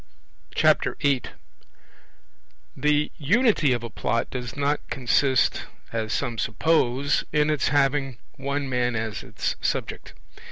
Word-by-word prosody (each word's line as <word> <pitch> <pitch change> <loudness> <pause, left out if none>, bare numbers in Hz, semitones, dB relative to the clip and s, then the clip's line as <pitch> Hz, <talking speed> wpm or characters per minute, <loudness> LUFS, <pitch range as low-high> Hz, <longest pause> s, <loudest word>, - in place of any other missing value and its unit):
8 140 -3 +2 1.5
The 150 0 +1
Unity 185 - +3
of 120 -1 0
a 115 - -5
Plot 115 +2 -1
does 125 -2 -5
not 145 +1 +1
consist, 130 +1 +2 0.3
as 110 -1 -2
some 120 -5 -2
suppose, 140 +2 +1
in 150 0 +2
its 150 - +1
having 135 -2 +1 0.2
one 140 +1 -2
man 125 -2 0
as 110 -1 -3
its - - -3
subject. - - -3
135 Hz, 115 wpm, -25 LUFS, 120-145 Hz, 1.5 s, Unity